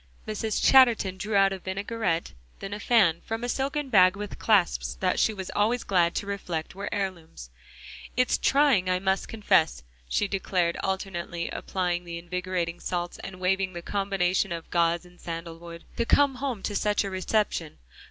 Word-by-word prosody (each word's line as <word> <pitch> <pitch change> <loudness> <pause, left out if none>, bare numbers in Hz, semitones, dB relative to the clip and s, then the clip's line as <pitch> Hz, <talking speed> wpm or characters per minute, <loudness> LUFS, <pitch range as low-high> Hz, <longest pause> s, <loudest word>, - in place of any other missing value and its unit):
Mrs. 215 0 -2
Chatterton 235 -8 +5
drew 210 +2 -3
out 195 0 +5
a 190 - -6
vinaigrette, 190 - -2 0.3
then 195 +1 -6
a 205 - -5
fan 195 -9 +3
from 225 +1 -4
a - - -1
silken 275 +3 -2
bag, 185 -4 +6
with 205 0 -7
clasps 205 -6 +2
that 185 -1 0
she - - +3
was 190 -3 -6
always 225 +4 +1
glad 175 -3 +2
to - - -2
reflect 180 -5 -4
were 200 +2 -5
heirlooms. 170 - -5 0.7
"It's 255 0 +2
trying, 270 -10 +3
I 185 - +2
must 190 +1 0
confess," 165 - +2 0.3
she 205 - +1
declared, 185 -3 0
alternately 175 -3 -3
applying 180 -2 -2
the 170 -1 -6
invigorating 175 0 -3
salts 175 -1 -3
and 185 -1 -8
waving 190 0 0
the 170 0 -7
combination 195 -1 0
of 165 -1 -6
gauze 170 0 +2
and 180 0 -18
sandalwood, 170 0 -7
"to 235 - +1
come 285 -1 +4
home 255 -6 -3
to 205 - -3
such 210 0 +1
a 195 - -4
reception. 185 -4 -1
190 Hz, 170 wpm, -27 LUFS, 175-210 Hz, 0.7 s, bag